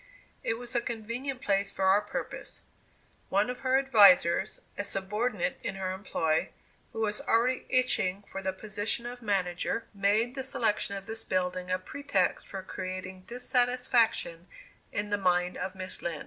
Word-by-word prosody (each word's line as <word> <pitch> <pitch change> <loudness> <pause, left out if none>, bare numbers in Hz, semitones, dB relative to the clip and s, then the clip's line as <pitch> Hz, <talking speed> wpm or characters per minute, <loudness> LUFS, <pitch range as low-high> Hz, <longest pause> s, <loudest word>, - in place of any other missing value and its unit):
It 225 - 0
was 245 +1 -8
a 240 - +2
convenient 235 +4 -4
place 200 0 +2
for 195 - -1
our 195 +2 +5
purpose. - - -6 0.7
One 205 +5 +2
of 250 - -8
her 260 0 +3
"advisers," 205 -10 +5 0.2
a 205 - -2
subordinate 200 -1 -1
in 195 - -3
her 190 -1 -2
employ, 165 -4 0 0.4
who 225 - -4
was 210 -1 0
already 245 +3 +2
itching 205 -7 +2
for 195 -1 -7
the 190 0 0
position 210 +4 -3
of 245 0 -6
manager, 195 0 0
made 210 +4 +2
the 265 -1 -4
selection 220 -6 0
of 195 0 -6
this 225 +1 -6
building 180 0 -1
a 185 - +2
pretext 200 -2 -1
for 190 -1 -6
creating 185 0 -6
dissatisfaction 245 -7 +1 0.4
in 205 0 -2
the 205 - +2
mind 180 -1 +2
of 190 +1 -4
Miss 185 -1 -3
Lind. 165 -3 -3
205 Hz, 160 wpm, -30 LUFS, 185-235 Hz, 0.7 s, our